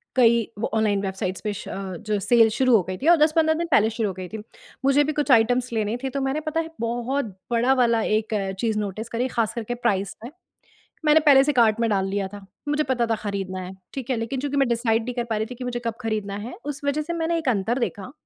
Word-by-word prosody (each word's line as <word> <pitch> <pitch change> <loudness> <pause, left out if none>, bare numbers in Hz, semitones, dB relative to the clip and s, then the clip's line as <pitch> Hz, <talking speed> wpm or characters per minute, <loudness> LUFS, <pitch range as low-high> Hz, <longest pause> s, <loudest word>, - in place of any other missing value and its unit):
कई 235 -3 +4
व 225 - 0
online 210 -3 +2
websites 190 -1 -3
पे 210 -1 -1
श - - -7
जो 195 +2 -3
सेल 225 +2 +5
शुरू 255 +2 +3
हो 210 - +5
गई 185 +1 -5
थी 280 - -3
और 340 0 +7
10-15 315 +1 +3
दिन 340 +1 -2
पहले 220 -3 +5
शुरू 225 -2 -1
हो - - -4
गई 185 0 -7
थी। 220 - -7 0.5
मुझे 280 +2 +5
भी 305 - -1
कुछ 295 -1 0
आइटम्स 245 +1 +3
लेने 215 0 0
थे 265 - -1
तो 275 +1 -3
मैंने 270 +3 0
पता 310 +1 -1
है 325 0 -3
बहुत 240 +4 -1 0.3
बड़ा 240 +3 +3
वाला 235 -3 +3
एक 215 +1 0 0.3
चीज 220 -1 0
नोटिस 215 +2 -4
करी, 245 +2 -1
खास 225 -3 -1
करके 235 +1 -4
प्राइस 200 -5 -1
में, 240 - -7 0.7
मैंने 305 +1 +6
पहले 270 -2 +7
से 295 +1 +1
कार्ट 230 -3 +4
में 230 -1 +1
डाल 195 -2 +1
लिया 195 0 -1
था, 200 0 -11 0.2
मुझे 295 +1 +1
पता 245 -2 +2
था 225 - +3
खरीदना 195 -3 -4
है 180 0 -7 0.2
ठीक 265 -3 -6
है, 255 - +2
लेकिन 230 +4 -3
चूँकि 285 +1 -2
मैं 275 -2 +3
डिसाइड 230 -1 +1
नहीं 250 +2 -4
कर 240 - -1
पा 220 - 0
रही 215 - -1
थी, 250 +2 -8
कि 250 - -7
मुझे 245 -1 -3
कब 230 - 0
खरीदना 215 -3 -2
है 250 - -7
उस 290 -2 -4
वजह 285 +2 +1
से 335 +3 -4
मैंने 335 0 0
एक 320 -5 -1
अंतर 230 +3 0
देखा 220 0 -3
235 Hz, 255 wpm, -24 LUFS, 215-270 Hz, 0.7 s, और